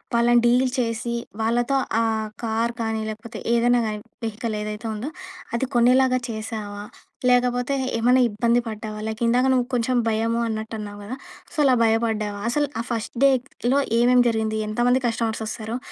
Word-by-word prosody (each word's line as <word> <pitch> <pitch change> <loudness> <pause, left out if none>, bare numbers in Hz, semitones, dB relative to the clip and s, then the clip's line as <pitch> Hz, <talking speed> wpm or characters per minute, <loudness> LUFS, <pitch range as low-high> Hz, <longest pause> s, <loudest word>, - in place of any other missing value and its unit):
వాళ్ళని 240 0 +4
డీల్ 250 +2 +4
చేసి, 235 0 -1 0.3
వాళ్ళతో 240 +4 +1 0.2
ఆ - - +2 0.4
కార్ 230 +1 0
కానీ 225 -1 -1
లేకపోతే 220 +2 -7
ఏదైనా 240 +1 +3
కానీ 210 -1 -3 0.3
వెహికల్ 220 0 -3
ఏదైతే 210 +2 -5
ఉందో, 220 +7 -4 0.5
అది 235 - 0
కొనేలాగా 255 +2 +4
చేశావా? 215 -2 -5 0.5
లేకపోతే 245 +1 +2 0.2
ఏమన్నా 250 +3 +4
ఇబ్బంది 235 +3 +2
పడ్డావా? 215 -1 -6
లైక్ 220 +2 -5
ఇందాక 250 +3 +3
నువ్వు 250 -1 +2
కొంచెం 245 +1 +1
భయము 225 +1 0
అన్నట్టు 220 0 -4
అన్నావు 205 -1 -7
కదా! 250 +6 -6 0.4
సో - - -3
అలా 260 -2 +5
భయపడ్డావా? 220 -2 0
అసలు 290 +1 +1
ఆ - - -5
ఫస్ట్ 230 +1 -3
డేలో 260 0 +1 0.2
ఏమేం 250 +1 +5
జరిగింది? 220 -1 -1
ఎంతమంది 245 +4 +2
కస్టమర్స్ 225 -1 -1
వస్తారో? 220 +2 -4
230 Hz, 150 wpm, -23 LUFS, 220-245 Hz, 0.5 s, అలా